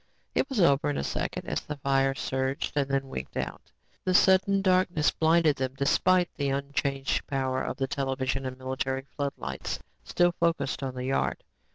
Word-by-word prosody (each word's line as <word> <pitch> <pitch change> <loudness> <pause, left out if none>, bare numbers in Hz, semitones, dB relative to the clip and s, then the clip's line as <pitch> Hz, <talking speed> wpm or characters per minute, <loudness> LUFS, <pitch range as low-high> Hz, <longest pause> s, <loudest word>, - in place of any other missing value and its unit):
It 265 - +1
was 265 -6 -2
over 145 -5 +4
in 145 - -1
a - - -1
second - - -3
as - - -1
the 150 - -6
fire 135 0 +2
surged 135 +2 -2
and 140 -2 +1
then 135 0 0
winked 65 - -6
out. - - -5 0.3
The 185 - +1
sudden 195 +1 +4
darkness 185 -4 +3
blinded 160 -2 +3
them 130 0 -2
despite 180 +6 +3
the 140 -2 0
unchanged 140 0 -1
power 130 -1 -1
of - - -3
the 135 - 0
television 135 -1 -1
and 130 0 -6
military 130 +1 -3
floodlights 140 - -3 0.3
still 175 0 +2
focused 165 -6 0
on 130 -2 -3
the 125 0 -4
yard. 135 +1 0
140 Hz, 175 wpm, -28 LUFS, 135-165 Hz, 0.3 s, over